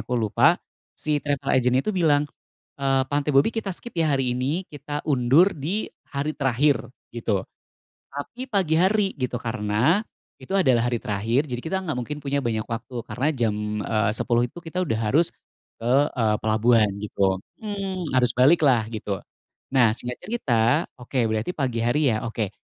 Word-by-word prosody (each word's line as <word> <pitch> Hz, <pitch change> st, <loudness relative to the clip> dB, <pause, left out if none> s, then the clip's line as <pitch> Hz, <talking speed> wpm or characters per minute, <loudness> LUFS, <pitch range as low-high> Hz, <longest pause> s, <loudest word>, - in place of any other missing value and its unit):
aku 125 Hz, -, -2 dB
lupa 120 Hz, +9 st, +3 dB, 0.4 s
si 150 Hz, -1 st, -1 dB
travel 145 Hz, 0 st, -1 dB
agent 125 Hz, -1 st, +3 dB
itu -, -, 0 dB
bilang, 155 Hz, -6 st, +3 dB, 0.5 s
eee, 135 Hz, -1 st, +2 dB
"Pantai 145 Hz, +1 st, 0 dB
Bobby 135 Hz, +6 st, +5 dB
kita 215 Hz, -4 st, -2 dB
skip 235 Hz, +3 st, -6 dB
ya 160 Hz, -3 st, +2 dB
hari 130 Hz, -3 st, 0 dB
ini, 145 Hz, +9 st, -2 dB
kita 145 Hz, 0 st, -5 dB
undur 140 Hz, +6 st, +5 dB
di 170 Hz, +10 st, -2 dB, 0.2 s
hari 145 Hz, +2 st, -2 dB
terakhir," 140 Hz, +1 st, +2 dB, 0.2 s
gitu. 115 Hz, -4 st, -1 dB, 0.7 s
Tapi 240 Hz, -, -7 dB
pagi 190 Hz, -8 st, +1 dB
hari 195 Hz, +1 st, +2 dB
gitu 125 Hz, -3 st, -3 dB
karena 115 Hz, -, +1 dB, 0.4 s
itu 195 Hz, -, -1 dB
adalah 125 Hz, -9 st, +3 dB
hari 120 Hz, -, 0 dB
terakhir, 115 Hz, +5 st, 0 dB
jadi 125 Hz, -4 st, -5 dB
kita 175 Hz, +7 st, -2 dB
enggak 155 Hz, -, -1 dB
mungkin 135 Hz, +4 st, -4 dB
punya 140 Hz, 0 st, -1 dB
banyak 110 Hz, -4 st, -1 dB
waktu 120 Hz, +1 st, -5 dB
karena 125 Hz, +7 st, -1 dB
jam, 120 Hz, -8 st, 0 dB, 0.3 s
eee, 110 Hz, 0 st, +1 dB
10.00 120 Hz, +2 st, +1 dB
itu -, -, -17 dB
kita 175 Hz, +1 st, -4 dB
udah 140 Hz, -12 st, 0 dB
harus 130 Hz, +10 st, +2 dB, 0.5 s
ke, 120 Hz, +2 st, 0 dB, 0.2 s
eee, 110 Hz, -4 st, +1 dB
pelabuhan 110 Hz, 0 st, +3 dB
gitu. 100 Hz, -2 st, 0 dB, 0.2 s
Mmm 200 Hz, -3 st, -4 dB, 0.2 s
harus 125 Hz, -2 st, +4 dB
balik 140 Hz, +7 st, +6 dB
lah 130 Hz, -7 st, +4 dB
gitu. 105 Hz, -2 st, -3 dB, 0.6 s
Nah, 125 Hz, -4 st, +5 dB
singkat 125 Hz, 0 st, -4 dB
cerita 150 Hz, -, +1 dB, 0.2 s
oke 125 Hz, +2 st, -6 dB
berarti 110 Hz, +6 st, -1 dB
pagi 125 Hz, -5 st, -1 dB
hari 135 Hz, +5 st, +2 dB
ya. 110 Hz, -, -2 dB
Oke 110 Hz, -3 st, -3 dB
130 Hz, 165 wpm, -24 LUFS, 115-155 Hz, 0.7 s, balik